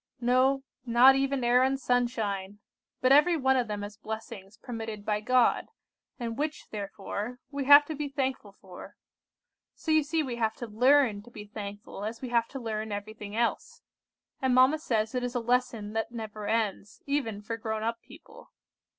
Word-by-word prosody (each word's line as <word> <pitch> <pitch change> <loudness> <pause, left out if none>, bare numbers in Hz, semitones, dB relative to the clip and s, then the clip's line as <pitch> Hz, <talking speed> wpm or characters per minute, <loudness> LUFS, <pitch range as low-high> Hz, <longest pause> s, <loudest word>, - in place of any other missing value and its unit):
No, 255 +2 +2 0.2
not 250 +2 +6
even 270 -1 0
air 245 +1 +4
and 265 +1 +2
sunshine; 220 -6 -1 0.4
but 255 - +3
every 300 +5 +6
one 265 -2 +3
of 250 -3 +1
them 205 -1 -4
as 205 0 -8
blessings 220 -2 -8
permitted 225 -3 -6
by 210 -1 0
God, 255 +2 +3 0.5
and 235 +1 -4
which, 300 +1 -3
therefore, 205 +3 -5
we 280 -1 -3
have 285 +1 +9
to 315 - -5
be 295 -1 -4
thankful 265 -6 -3
for. 190 -2 -12 0.8
So 320 - -3
you 310 0 +5
see 310 +2 -1
we 250 -4 -4
have 220 -1 0
to 240 - -6
learn 240 0 +3
to 230 - -15
be 210 -3 -10
thankful 205 -1 -8
as 225 +2 -4
we 255 - -6
have 235 -1 +2
to 270 - -7
learn 220 -2 -4
everything 205 0 -6
else, 235 0 -2 0.6
and 260 -2 +2
mamma 260 +5 +5
says 225 -8 -1
it 250 -1 -1
is 245 0 -3
a - - +2
lesson 235 -3 -1
that 225 +1 -2
never 215 -3 -6
ends, 210 -3 -2
even 245 -8 -2
for 230 +2 -3
grown 220 -1 -3
up 230 +1 -2
people. - - -15
235 Hz, 180 wpm, -28 LUFS, 215-265 Hz, 0.8 s, have